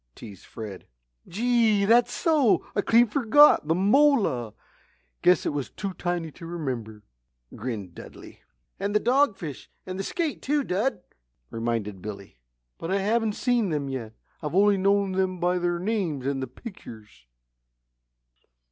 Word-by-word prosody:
teased 100 -6 -12
Fred. 105 -4 -9 0.4
"Gee, 225 -1 +2
that's 240 +3 +4
so! 300 - +2
I 205 - +2
clean 230 +4 +5
forgot 265 - +5
the 165 - +2
mola; 200 - +2 0.7
guess 180 0 +4
it - - -1
was 145 -3 -3
too 195 -2 -5
tiny 175 -3 -3
to 165 +2 -11
remember," 125 -11 -5 0.5
grinned 105 -7 -5
Dudley. - - -12 0.4
"And 200 +2 -2
the - - +5
dogfish, 225 - 0 0.2
and 185 +1 -6
the - - -2
skate, 320 - -3
too, 290 +1 0
Dud," 200 0 -1 0.5
reminded 115 -4 -3
Billy. 100 - -9 0.4
"But 165 - -5
I 195 - +1
haven't 215 +2 0
seen 240 -3 0
them 145 -3 -2
yet 120 -5 -5 0.3
I've 150 +1 -4
only 205 +1 +5
known 200 0 +2
them 185 -1 -1
by 180 +1 +1
their 175 0 0
names 175 - -2
and 135 -1 -1
the 130 - -3
pictures." 110 - -12
180 Hz, 145 wpm, -26 LUFS, -, 0.7 s, clean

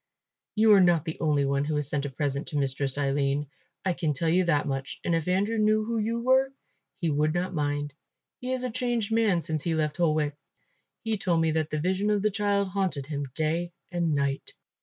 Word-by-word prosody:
You 215 0 +6
are 195 - +7
not 175 -4 +4
the 160 - -5
only 145 -3 +2
one 140 0 +1
who 150 +1 -1
has 150 -2 -1
sent 145 -1 -1
a - - -5
present 140 +1 -2
to 150 - -3
Mistress 135 0 -1
Aline. 140 0 0 0.4
I 185 - +2
can 160 -3 -1
tell 165 +4 0
you 180 +3 +3
that 150 -4 +1
much, 135 -1 -4
and 170 - 0
if 165 -1 0
Andrew 200 +5 +1
knew 215 0 +3
who 230 0 -1
you 230 +2 -1
were, 260 +2 +3 0.5
he 170 -4 0
would 150 +2 +1
not 180 +1 -1
mind. 145 -2 -1 0.5
He 250 +1 -4
is 255 -1 -1
a 250 - -2
changed 240 -3 -1
man 215 -6 +3
since 155 -1 -2
he 165 +1 -1
left 155 0 -1
Holwick. 155 -4 +1 0.7
He 220 -3 -1
told 175 -4 +1
me 160 -1 +2
that 155 -1 0
the 155 - -2
vision 190 +5 0
of 205 -1 +1
the 215 - +2
child 200 -1 +1
haunted 185 -8 -1
him 145 -1 -4
day 165 +2 -1 0.2
and 170 -3 0
night. 140 -1 -1
165 Hz, 220 wpm, -27 LUFS, 145-205 Hz, 0.7 s, are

